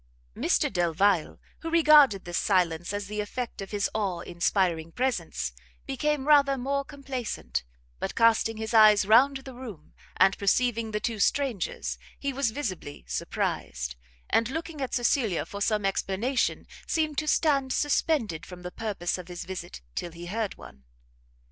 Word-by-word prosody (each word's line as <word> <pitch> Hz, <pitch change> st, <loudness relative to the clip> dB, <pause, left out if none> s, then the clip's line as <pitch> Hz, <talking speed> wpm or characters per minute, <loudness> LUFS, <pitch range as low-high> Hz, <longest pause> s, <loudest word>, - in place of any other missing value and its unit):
Mr -, -, +1 dB
Delvile, 175 Hz, 0 st, +2 dB, 0.2 s
who 330 Hz, -, -5 dB
regarded 300 Hz, -, +6 dB
this 175 Hz, -1 st, -1 dB
silence 175 Hz, -3 st, +1 dB
as 205 Hz, 0 st, -3 dB
the 210 Hz, +1 st, -3 dB
effect 230 Hz, +2 st, -5 dB
of 195 Hz, -, -6 dB
his 205 Hz, -1 st, 0 dB
awe 195 Hz, -5 st, -1 dB
inspiring 170 Hz, -2 st, 0 dB
presence, 180 Hz, -, -2 dB, 0.3 s
became 290 Hz, +1 st, -1 dB
rather 280 Hz, -2 st, +5 dB
more 280 Hz, +2 st, -1 dB
complacent; 270 Hz, -, -4 dB, 0.4 s
but -, -, -3 dB
casting 225 Hz, -1 st, +3 dB
his 220 Hz, +1 st, -4 dB
eyes 215 Hz, -2 st, +7 dB
round 255 Hz, +7 st, +5 dB
the 265 Hz, 0 st, -10 dB
room, 225 Hz, -12 st, -10 dB, 0.2 s
and 190 Hz, +1 st, +5 dB
perceiving 230 Hz, +2 st, +1 dB
the 210 Hz, -1 st, -2 dB
two 225 Hz, 0 st, -3 dB
strangers, 245 Hz, -, 0 dB, 0.2 s
he 280 Hz, -1 st, -3 dB
was 270 Hz, -2 st, +1 dB
visibly 190 Hz, -, -5 dB
surprised, 60 Hz, 0 st, -3 dB, 0.4 s
and 230 Hz, +1 st, +3 dB
looking 320 Hz, +1 st, -5 dB
at 265 Hz, -, -2 dB
Cecilia 240 Hz, -, +1 dB
for 200 Hz, -, -8 dB
some 210 Hz, -1 st, +1 dB
explanation, 195 Hz, +6 st, 0 dB, 0.2 s
seemed 310 Hz, -3 st, 0 dB
to 305 Hz, -, -4 dB
stand 280 Hz, -4 st, +2 dB
suspended 280 Hz, -, +1 dB
from 180 Hz, -1 st, -10 dB
the 180 Hz, -, -6 dB
purpose 195 Hz, -5 st, -3 dB
of 180 Hz, -, -9 dB
his 175 Hz, -1 st, -7 dB
visit 175 Hz, -, -7 dB
till 170 Hz, -, -4 dB
he 170 Hz, +1 st, -9 dB
heard 210 Hz, +3 st, -3 dB
one. 65 Hz, -, -13 dB
215 Hz, 155 wpm, -27 LUFS, 180-265 Hz, 0.4 s, eyes